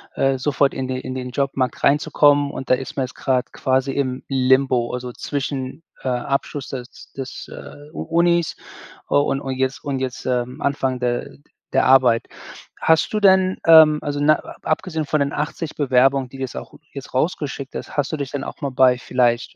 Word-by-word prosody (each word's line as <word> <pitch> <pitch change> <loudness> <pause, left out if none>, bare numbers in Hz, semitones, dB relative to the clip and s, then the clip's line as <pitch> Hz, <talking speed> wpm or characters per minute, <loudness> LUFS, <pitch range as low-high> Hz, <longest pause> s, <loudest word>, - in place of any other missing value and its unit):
äh, 135 -1 +1
sofort 140 +1 +1
in 130 -1 -4
de 130 0 -2
in 130 0 -6
den 125 -1 -4
Jobmarkt 135 -1 -1
reinzukommen. 145 0 +3
Und 135 - -7
da - - +6
ist 130 +1 -3
man 135 - +1
jetzt 125 - -12
grad 130 -2 -1
quasi 130 +1 0
im 130 -2 -2
Limbo, 130 -2 +2
also, 125 0 -5
zwischen, 140 +2 -4 0.2
äh, 130 - -1
Abschluss 135 +2 -2
des 125 -2 -9
des, 135 -1 -7
äh, 145 +1 -11
U - - -5
Unis 170 0 +1 0.5
u - - +1
und 140 -1 0
und 135 -1 -4
jetzt 130 +2 -2
und 135 -2 -2
jetzt, 130 -1 -4
ähm, 125 0 -2
Anfang 135 -2 -1
der 120 -1 -1 0.4
der - - +3
Arbeit. 125 -3 +4 0.5
Hast 160 +5 +3
du 215 - 0
denn, 190 -1 +4
ähm 160 -2 +8
also, 145 0 -3
na 150 +1 +5
a - - -10
abgesehen 160 -1 -1
von 150 0 0
den 140 0 0
80 150 +2 -4
Bewerbungen, 135 -1 +3
die 130 - -14
du 135 - -8
jetzt 130 - -4
auch - - -8
die - - -15
du 150 - -36
jetzt - - -14
rausgeschickt 140 -1 -2
hast, - - -7
hast 145 -2 0
du 155 - -2
dich 140 -2 -4
denn 140 -1 -3
auch - - -8
mal 140 -3 -3
bei 125 -1 +4
vielleicht 120 -1 0
135 Hz, 205 wpm, -21 LUFS, 130-145 Hz, 0.5 s, ähm